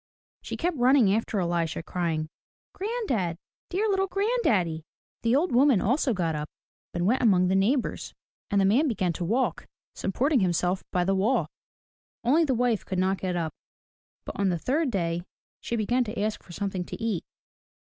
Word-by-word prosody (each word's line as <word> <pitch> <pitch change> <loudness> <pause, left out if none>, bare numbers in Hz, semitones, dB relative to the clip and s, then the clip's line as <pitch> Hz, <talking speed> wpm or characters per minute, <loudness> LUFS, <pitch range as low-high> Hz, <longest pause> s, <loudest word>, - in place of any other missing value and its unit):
She - - -5
kept 345 -2 -1
running 245 -5 +5
after 220 -1 0
Elisha 170 -2 -1
crying, 165 -3 -2 0.5
Granddad, 370 - -2 0.3
dear 400 +5 0
little 385 -1 +1
granddaddy!" 360 - +1 0.4
The 230 +2 +2
old 335 +6 +2
woman 255 -2 +5
also 255 +7 +1
got 175 -6 0
up 150 0 -4 0.4
and 175 0 -1
went 240 +7 +2
among 185 -6 +4
the 190 - +2
neighbors, 235 +8 0 0.3
and 200 - +2
the 195 - +4
man 245 +11 +4
began 185 -8 0
to 175 - -4
walk, 225 0 0 0.3
supporting 260 +8 +1
himself 180 0 +1
by 180 - +1
the 195 +2 +1
wall. 205 +7 +1 0.7
Only 305 +7 +4
the 265 -4 +1
wife 240 -3 +1
could 185 - -4
not 190 +1 +1
get 185 -1 -2
up. 165 -3 -2 0.7
But - - -7
on 200 -1 +2
the 175 - 0
third 280 - 0
day 170 -5 -1 0.4
she 235 - -3
began 240 +3 +1
to 215 0 -5
ask 215 +1 -1
for - - -15
something 190 0 -3
to - - -7
eat. 220 -6 -1
205 Hz, 175 wpm, -27 LUFS, 180-260 Hz, 0.7 s, running